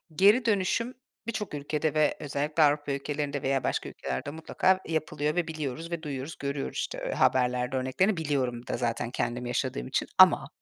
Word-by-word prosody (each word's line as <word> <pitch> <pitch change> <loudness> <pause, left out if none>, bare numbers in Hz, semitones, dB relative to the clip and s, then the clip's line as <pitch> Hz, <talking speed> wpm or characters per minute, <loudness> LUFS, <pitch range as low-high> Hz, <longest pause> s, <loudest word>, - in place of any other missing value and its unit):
Geri 210 +7 +5
dönüşüm 225 +4 +1 0.3
birçok 215 -6 -3
ülkede 150 +1 -1
ve 155 -1 +2
özellikle 150 +2 0
Avrupa 145 -1 +2
ülkelerinde 145 0 -2
veya 135 -1 0
başka - - -1
ülkelerde 65 - -4
mutlaka 185 +4 +1
yapılıyor 155 -1 -1
ve 175 -2 0
biliyoruz 160 +1 -4
ve 170 -2 -3
duyuyoruz, 140 +1 -5
görüyoruz, 140 0 -3
işte, - - -3
haberlerde 125 0 +2
örneklerini 170 +10 +1
biliyorum 130 -6 -1
da - - -2
zaten 120 -1 -1
kendim 120 0 -2
yaşadığım 120 - -2
için. - - -1
Ama - - +7
145 Hz, 160 wpm, -28 LUFS, 130-160 Hz, 0.3 s, Ama